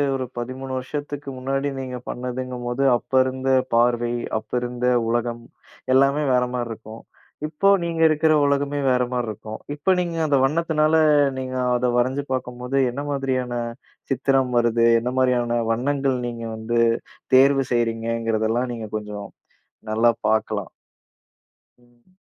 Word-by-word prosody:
ஒரு 130 -1 -3
13 130 +2 -5
வருஷத்துக்கு 145 +1 -6
முன்னாடி 135 +2 -1
நீங்க 125 -1 -5
பண்ணதுங்கும்போது, 125 0 -3
அப்ப 130 - -19
இருந்த 130 0 -2 0.3
பார்வை, 120 0 +2 0.3
அப்ப 110 0 -20
இருந்த 125 0 -2 0.2
உலகம், 120 0 -1 0.5
எல்லாமே 140 +3 +3
வேற 125 0 +3
மாரி 120 -1 -2
இருக்கும். 110 0 -9 0.5
இப்போ 155 +6 0 0.2
நீங்க 165 -1 -2
இருக்குற 155 0 +3
உலகமே 140 0 0
வேற 125 -1 +3
மாரி 125 -2 -1
இருக்கும். 110 +1 -7 0.2
இப்ப 150 +6 +2
நீங்க 170 -2 -2
அந்த 145 -2 +3
வண்ணத்துனால 155 +1 +2 0.4
நீங்க 130 0 -4 0.2
அத 125 0 +1
வரைஞ்சு 130 +3 +1
பார்க்கும்போது, 125 +1 -3
என்ன 135 +4 -5
மாதிரியான 130 -3 -1 0.6
சித்திரம் 135 0 +1
வருது? 120 -1 +3
என்ன 125 +2 -3
மாரியான 120 -2 +2
வண்ணங்கள் 135 +2 0
நீங்க 115 -1 -6
வந்து 110 +2 -1 0.6
தேர்வு 135 +1 +5
செய்றீங்கங்கிறதெல்லாம் 115 0 0
நீங்க 115 -2 -6
கொஞ்சம் 105 -1 -7 0.6
நல்லா 115 +2 +4 0.2
பாக்கலாம். 110 -3 0 1.1
ம். 120 +8 -29
125 Hz, 125 wpm, -23 LUFS, 120-135 Hz, 1.1 s, தேர்வு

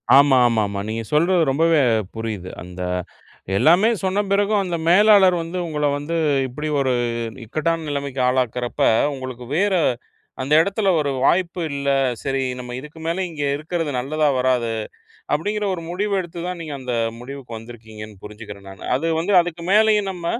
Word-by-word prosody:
ஆமா, 140 -1 +6
ஆமா, 115 -2 +1
ஆமா. 100 0 -4
நீங்க 115 +1 -3
சொல்றது 170 +4 +3
ரொம்பவே 160 +3 +3 0.4
புரியுது. 110 -5 -5
அந்த 90 +1 -9 0.8
எல்லாமே 175 - +5
சொன்ன 190 +2 +1
பிறகும் 205 +1 +2
அந்த 175 -3 -2
மேலாளர் 195 -1 +6
வந்து 165 +2 -5
உங்கள 150 -2 -1
வந்து 145 +4 -4 0.3
இப்படி 150 +5 -5
ஒரு 130 -2 +1 0.5
இக்கட்டான 160 +6 -1
நிலைமைக்கு 140 -2 -3
ஆளாக்கிறப்ப, 125 -1 -1 0.3
உங்களுக்கு 130 -2 -7
வேற 200 +1 +2 0.7
அந்த 135 +3 -1
இடத்தில 200 +2 0
ஒரு 145 -2 0
வாய்ப்பு 175 +1 +1
இல்ல. 140 0 -2 0.3
சரி 135 -1 -1 0.2
நம்ம 125 0 -7
இதுக்கு 150 +4 -12
மேலே 170 +3 -1
இங்கே 145 -3 -3
இருக்கிறது 160 0 -3
நல்லதா 150 +4 0
வராது. 125 -3 +1 0.6
அப்படிங்கிற 205 +7 -1
ஒரு 170 - -7
முடிவு 200 +4 -2
எடுத்து 175 -1 -6
தான் 180 -1 -4
நீங்க 155 -3 -6
அந்த 125 -1 -4 0.3
முடிவுக்கு 125 -1 -8
வந்திருக்கீங்கன்னு 110 -3 -11
புரிஞ்சிக்கிறேன் 105 -2 -10
நானு. 95 -1 -12
அது 140 +6 -2
வந்து, 175 +5 -1
அதுக்கு 170 -1 -6
மேலேயும் 210 -1 +4
நம்ம 175 -2 -8
150 Hz, 155 wpm, -21 LUFS, 125-175 Hz, 0.8 s, ஆமா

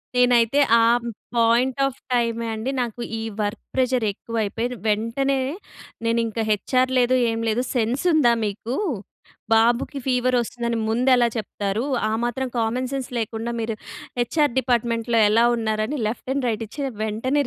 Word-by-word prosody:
నేనైతే 245 +1 +4 0.2
ఆ - - +4 0.5
point 235 +3 +3
of 270 -1 -3 0.2
టైమే 230 -1 0
అండి 220 +4 -3
నాకు 240 -1 -3 0.2
ఈ - - -4 0.2
వర్క్ 205 +1 -2
ప్రెజర్ 255 -2 +1
ఎక్కువైపోయి, 225 +2 -3 0.2
వెంటనే 230 +6 +1 0.7
నేనింకా 230 -1 0
హెచార్ 255 +5 +1
లేదు, 250 +1 +3
ఏం 225 0 -2
లేదు. 225 +3 +1
సెన్స్ 240 +3 0
ఉందా 285 -7 +5
మీకు, 215 +4 -4 0.8
బాబుకి 235 +5 +2
ఫీవర్ 255 0 +2
వస్తుందని, 235 0 -2
ముందెలా 245 +1 +4
చెప్తారు, 205 0 -2 0.3
ఆ - - -1
మాత్రం 255 +2 -1
కామన్ 240 +3 0
సెన్స్ 270 -2 -3
లేకుండా, 225 +1 -3
మీరు 225 0 -2 0.4
హెచ్ఎర్ 290 +3 +1
డిపార్ట్మెంట్లో 235 -2 +1
ఎలా 225 +3 +4
ఉన్నారని, 220 +4 -1
లెఫ్ట్ 240 +4 -4
అండ్ 275 -2 -1
రైట్ 225 0 -2
ఇచ్చి, 285 +7 -6 0.2
వెంటనే 255 +7 0
235 Hz, 135 wpm, -23 LUFS, 225-255 Hz, 0.8 s, ఉందా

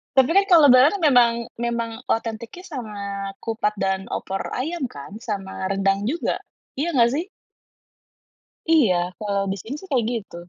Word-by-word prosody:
Tapi 265 -1 +5
kan, 395 +3 +5
kalau 340 -5 +7
lebaran 255 +3 +7
kan 380 - -5
memang 245 -5 +6 0.3
memang 235 -1 -2 0.2
otentiknya 230 +8 -3
sama 255 - -7 0.5
kupat 225 -2 -1
dan 190 -1 -1
opor 195 0 -4 0.2
ayam, 305 +3 -2
kan? 185 +5 -10
Sama 195 -4 -4
rendang 195 +1 +1
juga. 325 +7 -1 0.4
Iya 330 +5 -1
enggak, 235 -4 +5
sih? 345 - -3 1.4
Iya. 270 - +5 0.2
Kalau 200 -2 -1
biasanya 200 +7 -5
sih, 380 - -13
kayak 245 -5 +2
gitu. 215 -6 -6
235 Hz, 150 wpm, -23 LUFS, 200-280 Hz, 1.4 s, kalau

